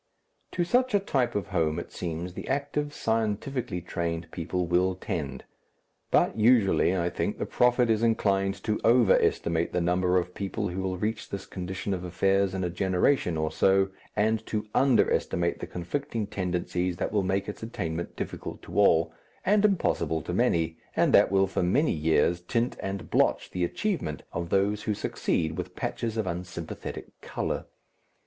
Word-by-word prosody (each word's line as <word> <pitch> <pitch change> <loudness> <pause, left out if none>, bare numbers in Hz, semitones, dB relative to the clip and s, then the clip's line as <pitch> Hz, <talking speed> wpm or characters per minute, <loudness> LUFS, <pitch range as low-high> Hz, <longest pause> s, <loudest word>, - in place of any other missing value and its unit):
To 175 - +1
such 250 +5 +2
a - - +5
type 130 - 0
of 100 -3 -2
home 80 -4 +1
it 85 - -6
seems 85 +1 -4
the - - -7
active, 145 +2 -1
scientifically 110 -3 -1
trained 85 -2 -3
people 90 +1 -2
will 90 +2 +2
tend. 80 -8 -4 0.7
But - - +3
usually, 110 -5 +4
I 85 -1 0
think, - - -2
the - - -2
prophet 125 0 +3
is 110 -1 +2
inclined 100 -4 +2
to 110 -1 0
over 115 -3 +5
estimate 85 0 0
the 90 - +2
number 90 +1 +2
of 90 0 -1
people 100 +1 -3
who 90 +2 -3
will 95 -1 -2
reach 110 +4 -3
this 100 -1 -5
condition 95 +2 -4
of 90 -2 -3
affairs 95 +2 +1
in 95 - -2
a 90 - 0
generation 90 - +1
or 80 0 -1
so, 95 0 +3 0.3
and 110 +1 +1
to 105 -1 -2
under 135 -3 +4
estimate 85 0 0
the - - -5
conflicting 115 - -3
tendencies 90 -2 -2
that - - -2
will 105 - +2
make 95 +1 -1
its 105 - -6
attainment 85 -7 -4
difficult - - -6
to - - -3
all, 80 -5 +4 0.3
and 205 +2 +4
impossible 85 - +1
to - - -4
many, 80 -1 +1 0.2
and - - +3
that - - +6
will 95 0 +4
for 95 - -2
many 125 - +2
years 80 +2 +2
tint 115 +7 -1
and 95 0 -5
blotch - - +2
the 90 - -1
achievement 115 - -2
of 85 0 -3
those 100 +2 +1
who 105 - -1
succeed 80 -4 -1
with - - -6
patches 115 -1 -3
of 110 - 0
unsympathetic 85 -2 -6
colour. - - -3
95 Hz, 170 wpm, -27 LUFS, 85-110 Hz, 0.7 s, that